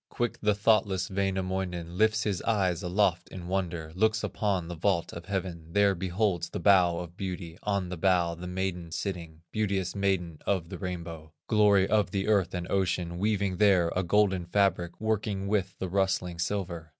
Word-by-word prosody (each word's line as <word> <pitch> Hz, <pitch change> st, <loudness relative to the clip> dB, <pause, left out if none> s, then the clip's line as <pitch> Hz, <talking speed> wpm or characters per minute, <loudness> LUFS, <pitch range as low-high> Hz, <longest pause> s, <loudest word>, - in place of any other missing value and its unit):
Quick 120 Hz, -1 st, -2 dB
the 105 Hz, -1 st, +2 dB
thoughtless 100 Hz, -3 st, +2 dB
Wainamoinen 95 Hz, -3 st, -2 dB
Lifts 110 Hz, +2 st, +3 dB
his 100 Hz, -4 st, -1 dB
eyes 95 Hz, -7 st, +1 dB
aloft 90 Hz, -1 st, +1 dB
in 90 Hz, -2 st, -8 dB
wonder, 85 Hz, -4 st, -2 dB
Looks 110 Hz, +4 st, +1 dB
upon 95 Hz, -5 st, -1 dB
the 85 Hz, -, -5 dB
vault 85 Hz, 0 st, 0 dB
of 85 Hz, 0 st, -8 dB
heaven, 90 Hz, -4 st, -4 dB
There 100 Hz, -1 st, +4 dB
beholds 95 Hz, 0 st, -1 dB
the -, -, -5 dB
bow 90 Hz, -4 st, +4 dB
of 85 Hz, 0 st, -7 dB
beauty, 90 Hz, -3 st, -6 dB
On 100 Hz, -3 st, -1 dB
the 90 Hz, -, -5 dB
bow 90 Hz, -1 st, +2 dB
the 85 Hz, +2 st, -8 dB
maiden 90 Hz, -2 st, -3 dB
sitting, 85 Hz, -3 st, -5 dB
Beauteous 100 Hz, -4 st, -1 dB
Maiden 95 Hz, -5 st, -1 dB
of 90 Hz, -4 st, 0 dB
the -, -, -7 dB
Rainbow, 85 Hz, -4 st, -6 dB
Glory 105 Hz, -3 st, +4 dB
of 105 Hz, -4 st, +2 dB
the 95 Hz, +2 st, -2 dB
earth 100 Hz, -4 st, +2 dB
and 90 Hz, -1 st, -3 dB
ocean, 90 Hz, -3 st, 0 dB
Weaving 100 Hz, -2 st, 0 dB
there 95 Hz, -5 st, +4 dB
a 90 Hz, -, +2 dB
golden 95 Hz, -1 st, +2 dB
fabric, 90 Hz, -2 st, +1 dB
Working 105 Hz, -2 st, -1 dB
with 100 Hz, -2 st, -1 dB
the 95 Hz, -, -3 dB
rustling 90 Hz, -2 st, 0 dB
silver. 85 Hz, -3 st, -3 dB
95 Hz, 175 wpm, -28 LUFS, 85-100 Hz, -, There